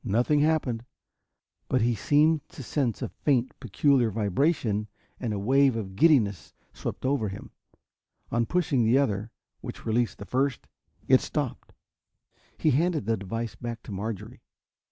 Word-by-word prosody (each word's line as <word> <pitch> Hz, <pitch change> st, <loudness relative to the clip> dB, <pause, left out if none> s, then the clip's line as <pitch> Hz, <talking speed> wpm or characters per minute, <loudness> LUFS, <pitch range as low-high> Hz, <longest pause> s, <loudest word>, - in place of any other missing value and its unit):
Nothing 120 Hz, +7 st, +2 dB
happened 145 Hz, -7 st, +1 dB, 0.9 s
but 130 Hz, -, +2 dB
he 120 Hz, +1 st, +2 dB
seemed 150 Hz, +7 st, +2 dB
to 135 Hz, -, -9 dB
sense 125 Hz, -1 st, -1 dB
a -, -, -3 dB
faint, 130 Hz, -4 st, 0 dB
peculiar 125 Hz, +2 st, +2 dB
vibration 110 Hz, -, 0 dB, 0.3 s
and 120 Hz, -4 st, -2 dB
a 105 Hz, -, -2 dB
wave 135 Hz, +5 st, +3 dB
of 95 Hz, -4 st, -5 dB
giddiness 110 Hz, -, +3 dB, 0.2 s
swept -, -, -5 dB
over 130 Hz, -6 st, +1 dB
him. 95 Hz, -, -9 dB, 0.8 s
On 115 Hz, -1 st, +1 dB
pushing 145 Hz, -7 st, +1 dB
the 115 Hz, +4 st, +4 dB
other, 110 Hz, -6 st, 0 dB, 0.3 s
which -, -, -8 dB
released 115 Hz, +1 st, 0 dB
the 100 Hz, -, -8 dB
first, 135 Hz, +3 st, -1 dB, 0.4 s
it -, -, +6 dB
stopped. -, -, -4 dB, 0.9 s
He 155 Hz, -, +2 dB
handed 155 Hz, -, +1 dB
the 115 Hz, +1 st, +1 dB
device 115 Hz, +4 st, -4 dB
back 120 Hz, -1 st, -6 dB
to -, -, -9 dB
Marjorie. 100 Hz, +1 st, -5 dB
120 Hz, 145 wpm, -27 LUFS, 110-140 Hz, 0.9 s, it